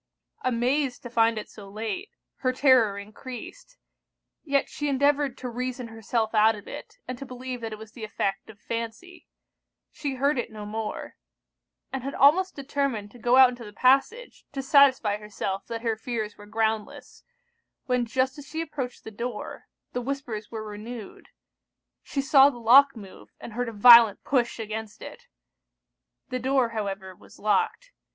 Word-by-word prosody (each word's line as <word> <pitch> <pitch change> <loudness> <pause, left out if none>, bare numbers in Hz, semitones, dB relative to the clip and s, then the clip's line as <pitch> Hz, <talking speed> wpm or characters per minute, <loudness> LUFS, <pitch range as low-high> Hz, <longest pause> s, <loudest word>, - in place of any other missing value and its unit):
Amazed 255 +2 0
to 240 - -8
find 230 -1 +3
it 215 - -5
so 200 -2 -12
late, 225 - -4 0.3
her 255 - 0
terror 255 -6 +4
encreased; 255 - -10 0.7
yet 280 -3 +1
she 295 0 -3
endeavoured 280 -1 +2
to 255 - -6
reason 250 0 -4
herself 225 0 -2
out 220 0 +5
of 205 - -12
it, - - -9
and 255 0 -5
to - - -6
believe 250 0 -6
that 225 -1 -5
it 215 - -6
was 220 0 -12
the 230 -1 -10
effect 200 -2 -3
of 210 -2 -13
fancy: 230 +13 -6 0.6
she 285 -3 -4
heard 275 +1 +1
it 240 - -4
no 210 -1 -8
more; 215 +1 -5 0.8
and 265 - -2
had 275 +3 -5
almost 365 +7 +4
determined 275 -7 -2
to 245 - -15
go 240 +3 +3
out 260 -1 +9
into 245 -1 -8
the 210 - -10
passage 275 - +1
to 270 -1 -4
satisfy 265 -7 +5
herself 200 -2 -5
that 230 0 -5
her 225 -2 0
fears 220 -2 -4
were 205 - -14
groundless, 220 0 -3 0.6
when 250 -1 +1
just 260 +4 0
as 285 - -11
she 315 +3 -5
approached 290 -6 -5
the 220 - -8
door, 235 +1 -6 0.3
the 245 - -2
whispers 245 -5 -5
were 220 -1 -6
renewed; 215 +1 -9 0.7
she 275 - -3
saw 275 0 +7
the 260 - -8
lock 265 +4 +6
move, 200 -4 -12
and 230 - -9
heard 245 +1 -2
a - - -6
violent 230 0 +8
push 245 -4 0
against 220 -1 -6
it. 485 0 -11 1.0
The 255 -1 -2
door, 260 -1 +2
however, 195 -4 -5
was - - -18
locked. 215 - 0
240 Hz, 170 wpm, -26 LUFS, 220-270 Hz, 1.0 s, out